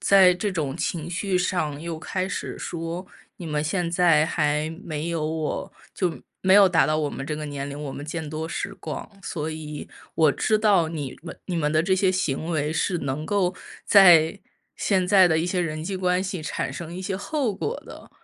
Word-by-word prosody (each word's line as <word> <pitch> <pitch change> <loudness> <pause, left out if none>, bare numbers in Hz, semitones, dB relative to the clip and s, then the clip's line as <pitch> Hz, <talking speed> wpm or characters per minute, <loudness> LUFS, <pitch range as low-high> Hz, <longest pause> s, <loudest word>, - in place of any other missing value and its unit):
在 190 -2 +6
这 190 +4 -2
种 150 -7 -2
情 170 -1 -3
绪 185 +2 -1
上 175 -5 -1
又 165 -1 -4
开 185 +3 -3
始 - - -4
说： 170 +2 -5 0.3
“你 175 - -7
们 150 -1 -1
现 175 +2 0
在 170 -3 +4
还 150 -1 0
没 155 0 -3
有 165 -2 -1
我 160 -1 -3 0.2
就 180 -4 -1 0.2
没 190 - +4
有 200 -1 +8
达 170 -2 +4
到 155 +2 +1
我 150 -2 0
们 135 - -6
这 150 +1 -3
个 155 - -5
年 140 -1 -5
龄， 145 +1 -6
我 145 -2 -5
们 145 - -7
见 155 0 -5
多 155 +1 -4
识 195 +3 -4
广， - - -6
所 155 -5 -3
以 150 -1 -7 0.3
我 155 -3 +5
知 215 +10 +1
道 200 -6 +4
你 150 -5 -5
们 170 - -9
你 180 - -3
们 150 -3 +1
的 155 +1 +3
这 190 +3 +2
些 190 0 +3
行 160 -5 -1
为 155 -2 0
是 175 +2 0
能 140 +1 -3
够 185 0 +1 0.3
在 180 -2 +7 0.3
现 190 -3 +1
在 185 -1 +6
的 160 -1 +2
一 165 - 0
些 180 0 0
人 155 -2 -3
际 195 +2 -3
关 180 -1 +1
系 190 -3 -4
产 - - -3
生 170 -1 -7
一 180 - -6
些 190 0 -3
后 255 +1 -1
果 455 - -3
的。” - - -12
165 Hz, 225 characters per minute, -25 LUFS, 155-185 Hz, 0.3 s, 有